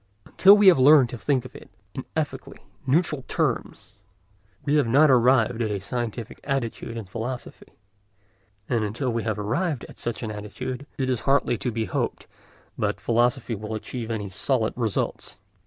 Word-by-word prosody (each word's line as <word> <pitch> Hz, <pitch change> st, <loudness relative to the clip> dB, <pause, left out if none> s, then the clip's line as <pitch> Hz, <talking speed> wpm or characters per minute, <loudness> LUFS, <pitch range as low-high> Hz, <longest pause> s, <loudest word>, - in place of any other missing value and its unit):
Until 200 Hz, +2 st, +6 dB
we 205 Hz, -, +4 dB
have 180 Hz, -7 st, +7 dB
learnt 135 Hz, -2 st, +6 dB
to 120 Hz, -, -5 dB
think 130 Hz, -2 st, 0 dB
of -, -, -11 dB
it -, -, -12 dB, 0.2 s
in -, -, -6 dB
ethically -, -, -3 dB, 0.3 s
neutral 150 Hz, 0 st, +1 dB
terms, -, -, -2 dB, 0.7 s
we 145 Hz, +1 st, +2 dB
have 145 Hz, -5 st, +2 dB
not 140 Hz, +5 st, +5 dB
arrived 125 Hz, -2 st, +3 dB
at 110 Hz, -, 0 dB
a 105 Hz, -, -1 dB
scientific 115 Hz, +2 st, -5 dB
attitude 120 Hz, -4 st, -3 dB
in 110 Hz, -, -6 dB
philosophy; 120 Hz, +6 st, -7 dB, 0.9 s
and 115 Hz, -3 st, 0 dB
until 120 Hz, +5 st, -2 dB
we 115 Hz, -, -1 dB
have 110 Hz, -1 st, -2 dB
arrived 125 Hz, -, -2 dB
at -, -, -14 dB
such 120 Hz, +1 st, -4 dB
an 110 Hz, -, -3 dB
attitude, 125 Hz, +6 st, -6 dB
it 130 Hz, -, -1 dB
is 130 Hz, -3 st, 0 dB
hardly 135 Hz, -3 st, +3 dB
to 125 Hz, -, -2 dB
be 110 Hz, 0 st, -2 dB
hoped -, -, -3 dB, 0.5 s
that -, -, -1 dB
philosophy 120 Hz, +1 st, +1 dB
will 110 Hz, +1 st, -5 dB
achieve 115 Hz, +1 st, -6 dB
any 110 Hz, -3 st, -3 dB
solid 110 Hz, +4 st, 0 dB
results. 115 Hz, -5 st, -3 dB
120 Hz, 170 wpm, -25 LUFS, 110-135 Hz, 0.9 s, have